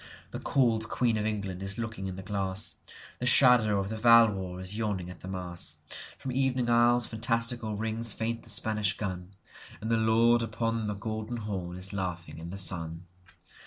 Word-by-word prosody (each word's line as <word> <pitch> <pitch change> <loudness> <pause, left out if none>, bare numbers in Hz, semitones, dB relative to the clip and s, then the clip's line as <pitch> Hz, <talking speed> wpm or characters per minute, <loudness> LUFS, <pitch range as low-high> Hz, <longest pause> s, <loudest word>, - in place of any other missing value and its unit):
The - - -5
cold 115 -5 +2
queen 120 -3 +1
of 105 0 0
England 100 -4 -3
is 100 +1 -3
looking 115 -4 -4
in 95 - -5
the 95 - -7
glass; 95 0 -2 0.4
The 125 - -1
shadow 125 -6 +5
of 100 0 -2
the 110 - -4
Valois 105 -6 +5
is 95 +2 -6
yawning 100 -5 -2
at 90 - -12
the - - -10
Mass; 90 -2 -4 0.4
From 130 - -5
evening 130 -2 +1
isles 120 0 +4
fantastical 115 0 0
rings 110 +2 -2
faint 115 +2 -2
the 115 - -9
Spanish 105 -2 +1
gun, 95 -2 -5 0.4
And 110 +2 -3
the 115 - +4
Lord 115 +2 +4
upon 115 0 -1
the 105 - -2
Golden 110 +3 -4
Horn 95 -5 -4
is 95 +2 -6
laughing 90 -4 -4
in 85 +1 -7
the 95 - -6
sun. 85 -2 -1
110 Hz, 180 wpm, -29 LUFS, 95-115 Hz, 0.4 s, shadow